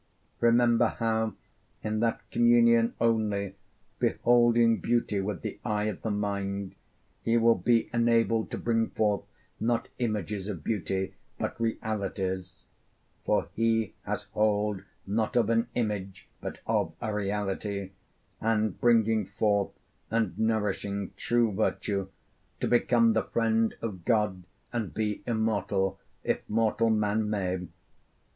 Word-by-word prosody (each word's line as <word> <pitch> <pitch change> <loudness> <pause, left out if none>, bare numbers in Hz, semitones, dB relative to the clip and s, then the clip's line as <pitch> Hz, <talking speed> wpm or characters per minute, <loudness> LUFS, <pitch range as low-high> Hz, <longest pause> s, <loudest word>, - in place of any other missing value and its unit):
Remember 120 0 +4
how 110 -1 0 0.5
in 110 0 -1
that 115 0 0
communion 115 -1 +4
only, 105 -4 +1 0.5
beholding 120 -1 +4
beauty 115 -4 +1
with 95 -3 -4
the - - -5
eye 105 -1 0
of 105 -3 -3
the 110 - -2
mind, 100 -1 -2 0.5
he 115 +1 +2
will 115 0 +5
be 115 +4 +2
enabled 115 -1 +2
to - - -4
bring 115 -1 +1
forth, 105 -2 +1 0.4
not 115 +1 0
images 105 -4 -2
of 100 -6 -5
beauty, 95 -3 -1 0.2
but - - -4
realities 95 -5 -3 0.6
(for - - +1
he 115 -1 +1
has - - -3
hold 105 -2 +1 0.2
not 110 +4 -1
of 115 -2 +3
an 115 +1 +2
image 100 -5 -3
but - - -6
of - - 0
a 110 - -3
reality), 100 -1 -2 0.5
and 110 -3 0
bringing 110 -3 +3
forth 100 0 +1 0.4
and 110 -5 0
nourishing 100 -3 -1
true 120 -2 +2
virtue 100 -1 -1 0.5
to - - 0
become 120 -1 +4
the 110 - +1
friend 115 -1 +1
of 95 -6 -4
God 105 -5 +1 0.3
and 115 -5 -3
be 105 -2 -1
immortal, 105 -4 0 0.2
if - - 0
mortal 115 +1 +2
man 105 0 +1
may. 95 -3 -1
110 Hz, 125 wpm, -28 LUFS, 100-115 Hz, 0.6 s, will